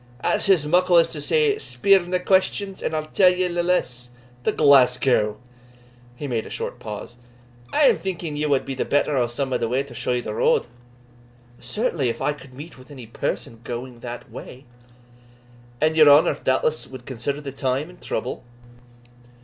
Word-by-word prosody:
"That's - - +1
as 175 -6 +4
muckle 175 +3 +3
as 165 - +5
to - - -5
say, 450 -3 +2
Speer 200 - +3
nae 180 0 -2
questions, 190 +1 0
and 160 - -2
I'll 155 0 -2
tell 185 +4 +4
ye 180 0 0
nae 175 0 -1
lees. 125 -9 -1 0.4
To - - +3
Glasgow?" 125 -6 +4 0.8
he 145 +3 -6
made 115 -4 -2
a - - -10
short - - -5
pause 105 +3 -8 0.5
"I 300 - +2
am 275 - +5
thinking 175 -5 -4
ye 150 +1 -1
wad 140 -2 +1
be 135 - -4
the 130 - -2
better 145 0 +1
o' 125 -2 +2
some 130 +2 -3
ane - - 0
to 125 +3 -1
show 120 +1 -2
you 120 0 -1
the 105 - -5
road." - - +2 0.9
"Certainly, 170 - -1
if 115 - -4
I 150 - 0
could 130 -3 -15
meet 145 +1 -10
with 130 - -16
any 130 -5 -10
person 115 0 -4
going 120 +1 -6
that 120 0 -8
way." 130 +2 -10 1.1
"And 155 +1 +2
your 155 -2 +7
honour, 145 +2 +6
doubtless, 140 +3 0
wad 130 -2 -11
consider 140 +3 -3
the 140 -2 -7
time 135 +2 -2
and 180 0 -16
trouble?" - - -4
140 Hz, 180 wpm, -23 LUFS, 125-175 Hz, 1.1 s, your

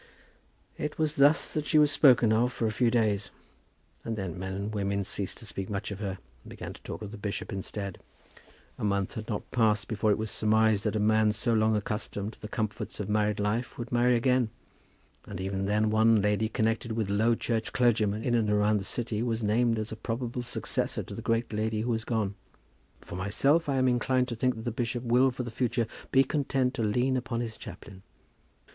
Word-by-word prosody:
It 150 - -3
was 155 -1 0
thus 145 +3 +4
that 150 -1 -2
she 155 - +3
was 150 -1 +5
spoken 120 -6 +5
of 120 +3 +2
for 115 - -2
a 110 - +1
few 120 +2 +2
days; 105 -4 +1 0.7
and 115 -1 -3
then 95 -5 -4
men 95 0 -4
and 100 +2 -4
women 100 -1 -1
ceased 95 0 -3
to - - -10
speak 95 -1 -5
much 105 +1 -3
of 100 - -6
her, 95 -3 -3 0.3
and - - -13
began - - -7
to - - -15
talk - - -7
of 105 - -7
the 110 - -9
bishop 100 0 -4
instead. 100 0 -5 0.8
A - - -5
month 100 -2 0
had 110 +1 -6
not 105 - -4
passed 110 -4 +2
before 110 -1 0
it 105 - +3
was 110 -1 -3
surmised 110 -1 +2
that 105 - 0
a - - +1
man 110 0 +3
so 115 +3 0
long 110 0 +3
accustomed 105 0 -3
to - - -20
the 105 - -5
comforts 110 -1 -4
of 105 -1 -3
married 105 0 +1
life 105 +4 -1
would 120 -1 -6
marry 120 0 +4
again; 125 -1 +2 0.8
and 100 -3 -6
even 95 +1 -2
then 105 +1 +2
one 110 0 +5
lady 105 +2 +1
connected 115 +1 0
with 110 -3 -1
low 110 +3 +3
church 115 -1 -2
clergymen 110 -3 +2
in 120 - 0
and 115 -3 +2
around 105 0 +3
the - - -5
city 110 +1 -2
was 115 -1 -1
named 115 +2 +2
as 110 0 -3
a - - -4
probable 115 +3 -3
successor 120 - -2
to - - -9
the - - -6
great 115 0 0
lady 110 0 -1
who 120 +2 -1
was 115 -1 -1
gone. 110 -4 -1 0.7
For - - -9
myself, 135 - +2
I 140 - +1
am 130 -1 +3
inclined 125 +1 +1
to 120 - -3
think 125 +2 +1
that 110 - -8
the 120 - -1
bishop 120 +1 -2
will 125 +2 +4
for 125 0 -4
the 120 - -6
future 120 0 0 0.3
be 135 0 +6
content 135 -2 0
to 130 - -3
lean 125 +5 +1
upon 125 -2 -2
his 115 -2 -4
chaplain. 95 +1 -10
110 Hz, 215 wpm, -29 LUFS, 105-120 Hz, 0.8 s, be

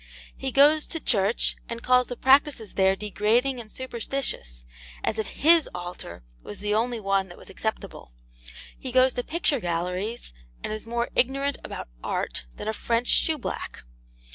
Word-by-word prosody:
He 265 -1 -4
goes 295 +3 +5
to 325 - -3
church, 210 -5 +3
and 235 0 -5
calls 250 0 +4
the 245 - -6
practices 265 -4 +3
there 190 0 +3
degrading 220 +6 +1
and 220 -3 -9
superstitious: 235 - -4 0.4
as 220 - -1
if 220 - -1
HIS 325 +2 +4
altar 175 - -7 0.2
was 105 - -8
the 210 0 -1
only 235 +2 0
one 195 -2 +1
that 175 - -12
was - - -12
acceptable. 220 - -5 0.7
He 260 - -5
goes 255 +1 +4
to 245 - -2
picture 310 -3 0
galleries, 180 - -3 0.3
and - - -2
is 215 +1 -6
more 235 +1 -1
ignorant 275 +2 +1
about - - -6 0.2
Art - - -2
than - - -7
a 220 - 0
French 235 +2 -1
shoeblack. 310 -6 0
235 Hz, 160 wpm, -26 LUFS, 195-265 Hz, 0.7 s, goes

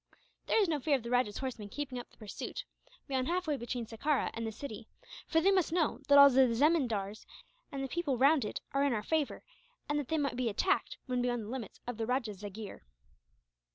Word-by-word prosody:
"There - - +3
is 405 - +4
no 310 -3 0
fear 285 +1 +2
of 260 - -3
the 235 - -5
rajah's 245 -4 +2
horsemen 240 -6 -5
keeping 265 0 -4
up 245 - -9
the - - -24
pursuit, 225 - -6 0.4
beyond 260 -1 0
halfway 345 -3 0
between 240 -2 -4
Sekerah 265 +6 0
and 230 0 -3
the - - -3
city; 220 -1 -8 0.4
for 325 - +3
they 390 +4 +5
must 370 -4 +2
know 330 -2 +1
that 285 - +7
all 280 0 +11
the 260 -2 +5
zemindars 230 -8 +1 0.5
and 270 -1 -3
people 290 -3 -1
round 280 +2 +5
it 210 - -4
are 275 +1 +2
in 280 -3 +2
our 210 -2 -1
favour, 310 +2 -1 0.4
and 295 0 0
that 285 - -4
they 320 - 0
might 280 -4 0
be 250 -2 +1
attacked, 375 - 0
when 250 -2 -1
beyond 245 -2 0
the 210 - -8
limits 240 -5 -6
of 245 -2 -4
the 225 -1 -2
rajah's 235 -6 -1
jagheer." 205 0 -7
260 Hz, 215 wpm, -32 LUFS, 230-295 Hz, 0.5 s, all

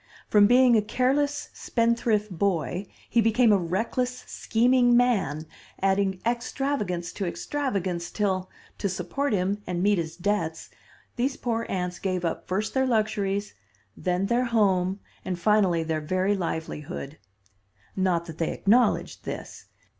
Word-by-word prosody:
From 205 -1 +6
being 245 +1 +6
a 215 - +5
careless 280 +6 0
spendthrift 230 -3 0
boy 180 0 -1 0.2
he 235 - +3
became 225 +1 +4
a - - +5
reckless, 230 +8 -2
scheming 245 +1 +3
man, 190 - +1 0.3
adding 195 -1 +1
extravagance 235 -7 -2
to 195 - -3
extravagance, 185 -8 -2
till, 190 -2 -1 0.3
to 200 - 0
support 190 +10 -2
him 200 +1 0
and 175 0 -1
meet 205 -2 +3
his 160 -1 -4
debts, 175 -4 -2 0.5
these 265 +3 0
poor 230 -2 -2
aunts 180 -1 -2
gave 185 -2 -1
up 165 - -3
first 210 +4 -1
their 265 0 +2
luxuries, 210 -3 0 0.4
then 180 +1 -1
their 240 +4 +1
home 195 -5 +2 0.2
and 180 - -3
finally 185 -3 +3
their 160 -1 -2
very 185 +6 +1
livelihood. 160 -4 -5 0.8
Not 180 -3 +1
that 165 -2 -10
they 165 - 0
acknowledged 240 +5 +2
this. - - -7
200 Hz, 135 wpm, -26 LUFS, 180-235 Hz, 0.8 s, From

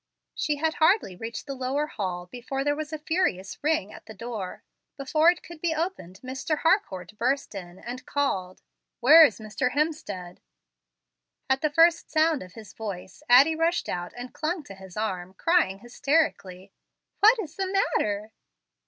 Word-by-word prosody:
She 300 - -1
had 315 +2 0
hardly 315 - +3
reached 225 +3 -6
the 280 - -5
lower 265 +3 -1
hall 185 -10 -4
before 250 +7 -4
there 290 +1 +1
was 305 0 -5
a 310 - -3
furious 300 - -1
ring 300 -10 0
at - - -13
the 220 - -10
door. 215 -3 -6 0.3
Before 305 +4 +3
it 355 0 0
could 335 -2 -12
be 330 -2 0
Opened 315 - -4
Mr. 265 +4 -2
Harcourt 210 - +1
burst 270 +2 0
in, 180 -2 -8
and 245 +5 -7
called, 190 -11 -2 0.4
"Where 305 +7 +9
is 275 -9 +4
Mr. 220 +3 -2
Hemstead?" 285 - -2 1.1
At 265 - +2
the 305 - +2
first 330 +3 +4
sound 315 -1 +2
of 180 -1 -11
his 220 -2 -12
voice 190 -4 -7
Addie 280 +6 +7
rushed 330 +2 0
out 175 0 -4
and 245 +1 -8
clung 325 +1 -2
to 200 - -11
his 190 -1 -12
arm, 190 -4 -3
crying 330 - +2
hysterically, 240 - -1 0.5
"What 440 +4 +7
is 335 -8 -6
the 385 -1 -2
matter?" 215 - 0
265 Hz, 165 wpm, -26 LUFS, 195-315 Hz, 1.1 s, Where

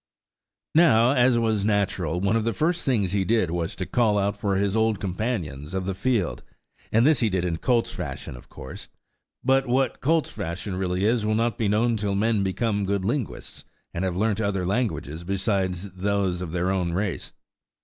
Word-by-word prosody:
Now, 125 -8 +5
as 125 -2 +4
was 110 -3 +1
natural, 95 -5 0
one 100 +4 +1
of 115 - +1
the 115 -2 -1
first 170 +3 0
things 105 -9 +1
he 100 -1 +1
did 110 -4 +1
was 85 -1 -2
to 95 - -4
call 110 -2 +2
out 100 0 +1
for 100 -3 -1
his 100 +1 +1
old 110 -2 +2
companions 90 - -3
of 95 -1 -2
the 95 - -1
field, 110 -2 0 0.5
and 115 +3 +4
this 150 -3 +4
he 115 - +2
did 95 -2 0
in 85 -2 -1
colt's 120 +6 +1
fashion - - -6
of 60 - -14
course; 65 - -9 0.6
but 135 +1 +3
what 130 0 +1
colt's 160 +3 +1
fashion 95 -1 -4
really 90 +1 -1
is 115 0 +2
will 110 0 +1
not 115 +1 +1
be 110 - 0
known 115 +3 +2
till 100 -1 -1
men 110 +1 +2
become 100 +2 0
good 100 -1 -1
linguists, 120 +1 -3 0.3
and 85 - -2
have 90 -2 -1
learnt 110 +1 +1
other 100 -3 -1
languages 85 - -2
besides 95 0 -1
those 95 -1 -1
of 90 -3 -5
their 90 +2 0
own 90 -3 -1
race. 100 0 -2
100 Hz, 190 wpm, -25 LUFS, 95-115 Hz, 0.6 s, Now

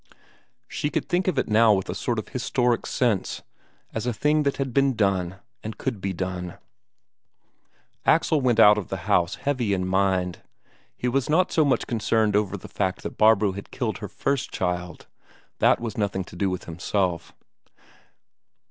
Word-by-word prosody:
She 150 - -2
could - - -2
think 180 +1 0
of 185 - 0
it - - +1
now 110 0 +5
with 95 -2 -1
a - - -3
sort - - -2
of - - -4
historic 120 -2 0
sense: 115 -7 0 0.5
as 110 +2 -3
a 120 - 0
thing 150 +7 +2
that 140 -2 0
had 135 -3 -3
been 135 -1 +3
done, 95 -4 0 0.3
and 110 -1 -6
could 115 -7 -3
be 95 - -2
done. 90 -1 -4 1.5
Axel 155 -2 +3
went 120 -3 +2
out 105 -1 +7
of 95 - -7
the - - -6
house 85 -1 +2
heavy 125 -8 -1
in 90 -1 -2
mind. 95 -2 0 0.6
He 125 - -2
was 135 +2 0
not 180 +4 +3
so 160 - +3
much 140 -3 +1
concerned 110 -2 +1
over 105 -2 +1
the - - -11
fact - - -2
that - - -7
Barbro 110 -2 +5
had 100 +1 -8
killed - - -3
her - - -5
first 140 -2 -2
child 90 -1 -3 0.5
that - - +4
was 115 -2 -5
nothing 100 -2 -1
to 90 - -13
do 95 +2 0
with 90 -1 -4
himself. 90 +1 -2
105 Hz, 175 wpm, -25 LUFS, 95-125 Hz, 1.5 s, out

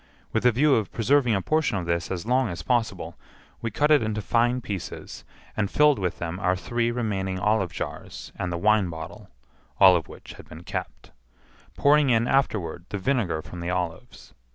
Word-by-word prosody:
With 115 +2 +3
a - - +6
view 140 +5 +3
of 110 -5 0
preserving 125 0 +2
a 95 - -1
portion 155 -9 +1
of 90 - -3
this 85 0 -1
as 95 0 -4
long 125 0 +2
as 85 - -6
possible, 120 -3 -1 0.4
we 115 - -2
cut 150 +5 +1
it 150 - +6
into 110 -1 -2
fine 120 +3 +1
pieces, 100 -6 -7 0.3
and 105 -2 0
filled 150 -5 +4
with 90 -2 -2
them 85 +2 -4
our 90 -1 +1
three 120 +5 -1
remaining 100 -6 -2
olive 95 -1 +1
jars - - -7
and 90 - -3
the 85 - -2
wine 105 0 +3
bottle 80 -1 -9 0.5
(all 95 -2 +8
of 80 -6 -1
which - - -12
had - - -14
been 80 +2 -11
kept), - - -6 0.7
pouring 145 -1 +4
in 115 0 +3
afterward 95 -11 0
the 105 - -3
vinegar 95 - -1
from 90 - -9
the 85 +1 -4
olives. 90 -2 -5
105 Hz, 190 wpm, -25 LUFS, 90-120 Hz, 0.7 s, all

